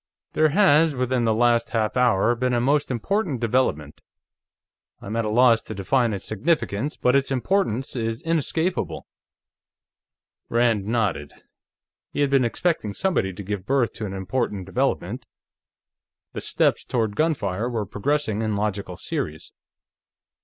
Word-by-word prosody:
"There 155 0 +3
has, 160 -3 +4
within 125 -1 0
the 110 - +3
last 120 0 +2
half 110 -2 0
hour, 120 -3 +3
been 125 +1 0
a - - +2
most 140 +4 +1
important 145 - -1
development. 110 - 0 1.0
I - - -13
am 105 +3 -4
at 115 -1 0
a - - -1
loss 115 0 +5
to - - -8
define 115 +5 +1
its 100 -2 -5
significance, 125 - -1
but 125 +2 +2
its 140 0 +2
importance 135 - 0
is 115 +3 -3
inescapable." 165 +2 -1 1.4
Rand 115 -4 +2
nodded. 105 -11 -1 0.8
He - - -2
had 140 -1 +2
been 135 -3 +4
expecting 120 - -1
somebody 180 - 0
to 100 +2 -8
give 100 0 -5
birth 135 -3 +1
to 110 - -5
an 95 - -6
important 95 0 -2
development; 95 - -2 1.1
the - - -5
steps - - +1
toward 110 -4 -1
gunfire 130 - 0
were 115 -4 -2
progressing 110 +1 -1
in 110 -2 -1
logical 100 -3 -3
series. 75 +1 -5
120 Hz, 145 wpm, -24 LUFS, 105-140 Hz, 1.4 s, loss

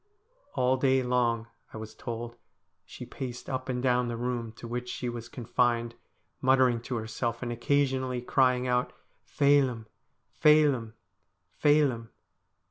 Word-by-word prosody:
All 130 +1 +2
day 130 0 +2
long, 120 -2 +1 0.3
I - - -8
was 110 0 -8
told, 120 0 -6 0.5
she - - -9
paced 125 -2 -7
up 130 0 -4
and 125 -1 -2
down 125 -1 +2
the 120 -1 -3
room 120 -1 -3
to 115 - -10
which 125 +1 -4
she 125 - -3
was 120 0 -7
confined, 120 -1 0 0.5
muttering 130 -3 +3
to 120 +1 -4
herself, 115 +2 -3
and 120 - -3
occasionally 130 0 0
crying 125 -1 +2
out 125 0 0 0.2
' - - -42
Phelim, 135 -5 +3 0.5
Phelim, 145 -7 +4 0.6
Phelim.' 140 -6 +2
125 Hz, 135 wpm, -28 LUFS, 120-130 Hz, 0.6 s, Phelim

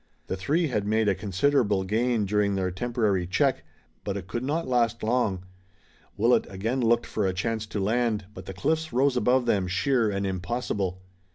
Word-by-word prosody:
The - - -3
three 150 - 0
had 105 -4 -1
made 110 0 +2
a 100 - +4
considerable 100 +2 +1
gain 110 +2 +1
during 100 0 +1
their 95 -1 -1
temporary 105 -3 0
check, 90 - +1 0.4
but 100 -1 -3
it 95 - -6
could 120 +6 -3
not 155 +4 -1
last 120 -2 +1
long. 110 -5 0 0.7
Willet 115 +4 +3
again 110 +7 -2
looked 120 0 +2
for 105 -3 -1
a 95 - 0
chance 110 +3 -2
to 105 -1 -4
land, 110 0 0
but - - -10
the 95 - -5
cliffs 160 +9 -1
rose 135 +2 +2
above 125 +1 +2
them 100 -5 +1
sheer 110 +5 +1
and 100 0 -2
impossible. 95 -1 -3
110 Hz, 180 wpm, -26 LUFS, 95-125 Hz, 0.7 s, a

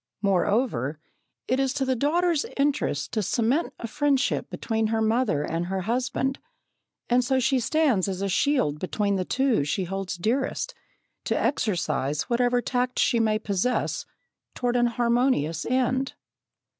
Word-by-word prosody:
Moreover, 195 - +1 0.5
it 255 - +1
is 270 -1 +1
to 275 -2 0
the 260 0 +1
daughter's 325 +4 +1
interest 270 - 0
to 215 - 0
cement 240 - +1
a - - -6
friendship 285 +2 0
between 220 -1 -1
her 225 0 0
mother 220 - +1
and 165 +3 -2
her 190 0 -2
husband, 255 +5 -1 0.7
and 245 +1 +3
so 260 +2 +1
she 260 +1 +2
stands 255 - +2
as 190 0 -3
a - - 0
shield 195 - +1
between 200 +3 0
the 185 -1 -1
two 260 - +1
she 150 +6 -1
holds 195 0 -4
dearest, 255 - -1 0.5
to - - 0
exercise 150 - 0
whatever 245 0 +1
tact 250 +1 -1
she 235 - +3
may 215 -1 +2
possess 210 +3 -1 0.5
toward 245 -1 -1
an 240 0 +4
harmonious 235 - +1
end. 260 +1 0
235 Hz, 145 wpm, -26 LUFS, 195-260 Hz, 0.7 s, an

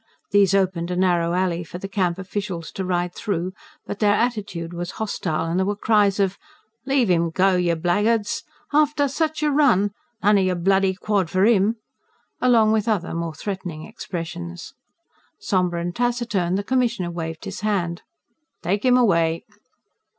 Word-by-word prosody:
These 200 -1 +4
opened 185 -3 0
a 180 - -2
narrow 175 -2 +2
alley 180 -2 0
for 170 +2 -8
the 195 - -6
Camp 185 -3 0
officials 190 -3 -5
to 190 - -4
ride 180 -1 -1
through, 185 -2 -3 0.3
but 205 - -6
their 205 -1 +4
attitude 205 -8 -2
was 175 +1 -5
hostile, 180 -7 -2
and 165 +2 0
there 190 - +2
were 205 - 0
cries 205 -1 +2
of: 195 -1 0 0.5
"Leave 265 -7 +3
'im 170 -1 +2
go, 185 +3 +3
yer 175 -2 +2
blackguards!... 205 +6 +1 0.3
after 295 -1 +3
sich 310 +2 -1
a 300 - +2
run! 245 -9 +3 0.3
None 205 0 +5
o - - +3
yer 185 -1 +1
bloody 190 +2 +2
quod 200 -3 0
for 185 +3 +2
'im!" 220 -1 +3 0.7
along 230 -4 +4
with 220 0 +1
other, 210 -6 0
more 165 -1 -3
threatening 180 -3 -5
expressions. 175 -4 -7 0.6
Sombre 180 -3 0
and 175 +1 -4
taciturn, 235 -7 0
the 200 - -1
Commissioner 235 -7 0
waved 165 -1 -5
his - - -6
hand. 180 -5 -1 0.6
"Take 200 +4 0
him 250 -1 +5
away!" 170 -8 +2
190 Hz, 165 wpm, -23 LUFS, 175-215 Hz, 0.7 s, None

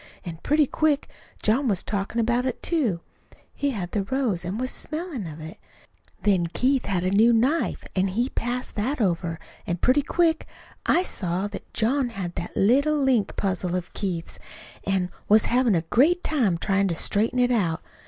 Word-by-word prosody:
An' 165 -2 -6
pretty 300 +1 +3
quick 295 +1 +1 0.4
John 250 +6 +2
was 195 -5 +1
talkin' 200 +2 -2
about 240 +2 +1
it, 255 - -4
too. 245 - 0 0.5
He 285 - -1
had 195 -9 -4
the 200 -2 -1
rose 235 -7 0
an' 180 +4 -3
was 255 +2 -2
smellin' 310 - -5
of 155 0 -8
it. 160 +1 -9 0.6
Then 190 -5 +3
Keith 255 +9 +1
had 185 -3 0
a 185 - +1
new 220 +4 +5
knife, 260 +8 +1
an' 190 +1 +2
he 230 +7 0
passed 245 0 -3
that 255 +8 -1
over, 170 -5 0 0.3
an' 175 - -1
pretty 255 +10 +3
quick 325 +2 +1 0.4
I 360 - +4
saw 185 - -1
that 205 - -9
John 250 +3 +2
had 190 -6 -5
that 170 - -6
little 280 +9 +3
link 260 -7 +2
puzzle 185 -2 -1
of 180 -1 -4
Keith's, 175 -5 -4 0.5
an' 185 -2 0 0.2
was 215 +1 +6
havin' 245 -4 +3
a 165 - +2
great 305 - +3
time 230 - +1
tryin' 195 +2 +1
to 170 - -1
straighten 215 +8 0
it 250 0 +3
out. 180 -9 0
220 Hz, 180 wpm, -25 LUFS, 185-260 Hz, 0.6 s, was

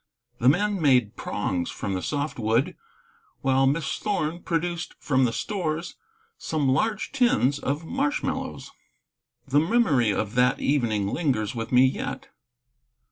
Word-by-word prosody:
The 125 - +5
men 200 +5 +1
made 125 -7 +3
prongs 90 -4 -2
from 100 - -4
the 95 - -2
soft 145 +1 -3
wood, 115 +10 +1 0.7
while 135 0 +3
Miss 145 +1 -1
Thorn 175 -5 -2
produced 170 0 -2
from 130 -3 +2
the 120 - 0
stores 170 - -3 0.4
some 155 -3 -1
large 210 +11 0
tins 240 - +2
of 145 +4 -2
marshmallows. 280 - -2 0.8
The 140 +2 +3
memory 160 - +3
of 105 +1 -1
that 125 +1 +3
evening 115 -8 +1
lingers 120 -8 -1
with 115 -2 -5
me 125 +1 +6
yet. 130 - -3
140 Hz, 135 wpm, -25 LUFS, 125-170 Hz, 0.8 s, me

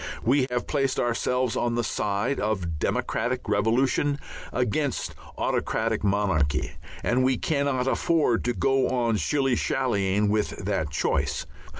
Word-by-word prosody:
We 130 +2 +3
have 125 0 -1
placed 135 -3 0
ourselves 125 +1 0
on 120 -1 0
the 120 - 0
side 105 +5 -1
of 90 -7 -2
democratic 125 - -1
revolution 120 +7 +2 0.3
against 125 +3 -1 0.2
autocratic 110 -1 0
monarchy, 95 -8 +1 0.3
and 125 +2 +2
we 130 -1 +2
cannot 140 -3 0
afford 140 -3 +2
to 120 -1 0
go 135 -1 +2
on 120 -3 +1
shilly 135 - +1
shallying 105 -6 +1
with 105 0 0
that 95 -7 -1
choice. 70 - 0
120 Hz, 125 wpm, -26 LUFS, 105-130 Hz, 0.3 s, We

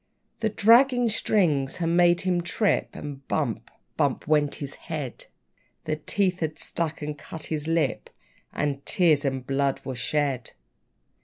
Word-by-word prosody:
The 220 -1 +1
dragging 240 +3 +5
string 170 -10 +2
had 165 +4 -2
made 175 0 +4
him 180 -2 +1
trip, 205 +4 0
And 140 -2 -8
bump! 120 -6 -2 0.3
bump! 145 -4 0
went 150 -2 +2
his 140 -1 -6 0.2
head; 145 -7 -5 0.6
The 155 -1 -2
teeth 185 +3 0
had 155 -1 -2
struck 165 -2 -3
and 150 0 -3
cut 155 +2 -9
his 155 0 -3
lip, 165 -1 0 0.4
And 140 -2 -2
tears 160 -6 +3
and 130 -2 -2
blood 135 0 0
were 130 - -3
shed. 130 -1 -1
155 Hz, 145 wpm, -26 LUFS, 140-175 Hz, 0.6 s, dragging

